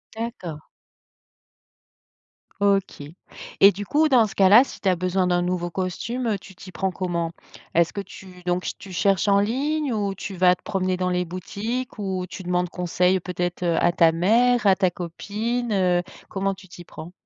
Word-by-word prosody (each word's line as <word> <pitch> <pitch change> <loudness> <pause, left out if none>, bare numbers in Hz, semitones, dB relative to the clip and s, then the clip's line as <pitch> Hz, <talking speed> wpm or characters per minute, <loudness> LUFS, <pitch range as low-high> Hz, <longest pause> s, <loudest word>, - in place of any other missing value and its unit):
D'accord. 185 -10 -6 2.0
OK 200 -6 +1 0.6
et 200 +1 +9
du 205 +2 -6
coup, 305 +7 +2
dans 235 -5 +5
ce - - -11
cas-là, 200 +5 +7
si - - -11
tu 195 - +2
as 180 - +3
besoin 185 +1 0
d'un 175 0 +2
nouveau 175 0 -1
costume, 195 +8 -3
heu, 210 -3 +1
tu 190 0 -14
t'y 185 0 -12
prends 190 +2 -2
comment? 170 -2 -2 0.4
Est-ce 170 0 +3
que 200 - -3
tu 185 -1 -13
donc 180 +1 -1
ch - - -2
tu 195 - -11
cherches 195 +2 +1
en 200 0 +5
ligne 275 +5 0
ou 200 -2 -1
tu 195 +1 -6
vas 180 0 +5
te - - -32
promener 185 -1 -1
dans 185 0 -1
les 180 0 0
boutiques 210 +9 -5
ou 190 -3 -3
tu 190 - -8
demandes 180 0 0
conseil 180 +1 +1
peut-être, 175 0 -3
heu, 170 -2 +1
à 175 - +3
ta 165 -1 +5
mère, 225 +6 +3
à 190 - +6
ta 185 -2 +2
copine, 215 +8 -3
heu, 180 -3 +2 0.3
comment 195 0 -1
tu 190 0 -14
t'y 175 0 -12
prends? 165 0 -10
185 Hz, 190 wpm, -23 LUFS, 180-205 Hz, 2.0 s, et